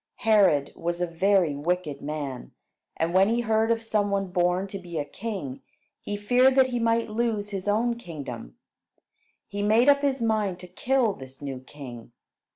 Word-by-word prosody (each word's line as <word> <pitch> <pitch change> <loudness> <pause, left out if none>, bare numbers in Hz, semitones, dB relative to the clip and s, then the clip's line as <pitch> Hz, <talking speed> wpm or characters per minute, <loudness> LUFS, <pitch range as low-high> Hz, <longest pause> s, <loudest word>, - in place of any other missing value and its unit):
Herod 200 -11 +4
was 170 +1 -3
a 175 - +1
very 175 -2 +2
wicked 155 -1 -2
man, 145 -4 -5 0.4
and 165 +1 0
when 190 +2 +5
he 235 +1 +1
heard 220 -1 +1
of 230 0 +1
some 210 -2 0
one 195 -2 -1
born 180 +1 +1
to 195 - -6
be 175 -3 -7
a 145 - -1
king, 185 - -6 0.4
he 205 - -4
feared 250 +5 +4
that 265 -1 +5
he 245 -1 -1
might 230 -1 +1
lose 215 -2 -1
his 195 -1 -5
own 230 +3 +2
kingdom. 140 - -8 0.9
He 205 - -4
made 220 +6 +4
up 280 0 +5
his 275 -2 +1
mind 215 -5 0
to 180 - -9
kill 240 +4 +1
this 130 -4 -12
new 135 -3 -5
king. 125 -3 -11
195 Hz, 175 wpm, -26 LUFS, 155-225 Hz, 0.9 s, when